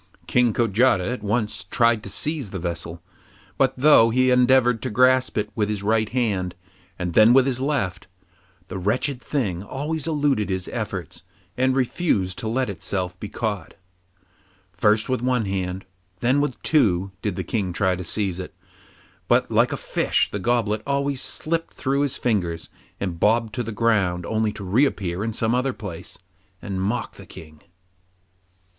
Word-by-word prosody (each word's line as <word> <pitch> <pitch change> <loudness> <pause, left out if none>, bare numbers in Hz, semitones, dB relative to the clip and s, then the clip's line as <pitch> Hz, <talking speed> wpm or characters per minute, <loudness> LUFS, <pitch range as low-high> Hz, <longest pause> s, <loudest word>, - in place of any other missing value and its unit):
King 125 -2 +3
Kojata 110 -2 +2
at 125 - -6
once 105 +1 -1
tried 115 -2 +2
to 100 - -8
seize 145 +3 -1
the 95 - -5
vessel, 85 -1 -5 0.6
but 135 -1 +3
though 130 -4 +6
he 130 +2 +3
endeavoured 125 -2 +4
to - - -3
grasp 130 +3 +3
it 105 0 -1
with 105 -2 -1
his 105 -2 -3
right 110 +1 +1
hand, 100 -7 -1 0.4
and 90 -2 -3
then 110 +5 +7
with 130 0 +6
his 130 -2 -1
left, 125 -10 -1 0.6
the 95 0 -5
wretched 125 +7 0
thing 110 - -2
always 145 +8 -4
eluded 145 -9 +1
his 95 -1 -2
efforts - - -5 0.3
and 130 +1 +2
refused 120 - 0
to 110 - -4
let 130 +4 0
itself 90 -2 -3
be 105 - -6
caught. 105 -3 -4 1.0
First 105 +5 +2
with 130 -2 -1
one 125 -3 +1
hand, 95 -1 -3 0.3
and - - -38
then 130 +4 +3
with 130 -5 -2
two, 100 - +2
did 105 -4 -2
the - - -3
King 100 -5 -2
try 95 0 +1
to 90 - -6
seize 95 0 -2
it, 90 - -7 0.7
but - - +2
like - - +3
a - - -2
fish - - +1
the 100 - -3
goblet 110 -1 0
always 140 -1 0
slipped 165 +1 -2
through 140 +1 0
his 145 -2 0
fingers 90 -8 -1 0.3
and 90 -4 -3
bobbed 110 +2 +2
to 130 - -2
the 115 -1 -4
ground 100 -6 +1
only 110 -1 0
to 100 - -8
reappear 95 -4 0
at 110 -1 -3
some 115 0 0
other 130 +1 +1
place, 95 -8 -8 0.4
and 95 -1 -4
mock 110 +6 -2
the - - -12
King. 80 -1 -13
110 Hz, 170 wpm, -23 LUFS, 95-130 Hz, 1.0 s, then